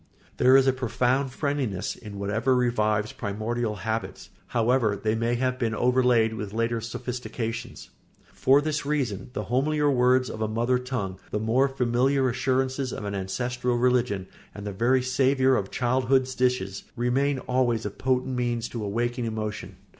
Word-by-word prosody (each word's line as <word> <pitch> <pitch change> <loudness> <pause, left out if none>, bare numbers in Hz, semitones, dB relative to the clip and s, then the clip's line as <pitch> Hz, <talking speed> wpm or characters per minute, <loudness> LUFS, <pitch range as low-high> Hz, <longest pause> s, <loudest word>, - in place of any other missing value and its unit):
There 130 +1 +6
is 135 - +4
a 130 - +4
profound 130 +1 0
friendliness 135 - -2
in 105 -3 -10
whatever 110 +6 +1
revives 110 -4 +1
primordial 110 +2 -2
habits, 110 0 -4 0.2
however 115 -2 +2
they 110 +2 -1
may 115 +2 0
have 130 +1 -1
been 115 -2 0
overlaid 125 -2 +3
with 105 -2 -5
later 115 0 0
sophistications. 115 0 -5 0.4
For 135 +2 +4
this 150 0 -2
reason 135 -10 -2
the 105 - -3
homelier 145 +6 +1
words 125 0 +3
of 110 - -6
a 110 - +1
mother 120 +3 +1
tongue, 120 -8 -4
the - - -2
more 120 +6 +2
familiar 130 +1 +1
assurances 130 +1 0
of 105 - -5
an 100 - -3
ancestral 120 +6 -2
religion, 120 -6 +1 0.3
and 105 0 -7
the 105 - -3
very 125 +5 +2
savour 130 +1 +3
of 100 -5 -1
childhood's 130 +1 +1
dishes, 125 -7 0
remain 135 +3 +1
always 125 -3 0
a 105 - -2
potent 130 +2 -1
means 120 -1 -1
to 115 -3 -5
awaken 120 +4 -1
emotion. 110 -2 -4
125 Hz, 155 wpm, -26 LUFS, 110-130 Hz, 0.4 s, There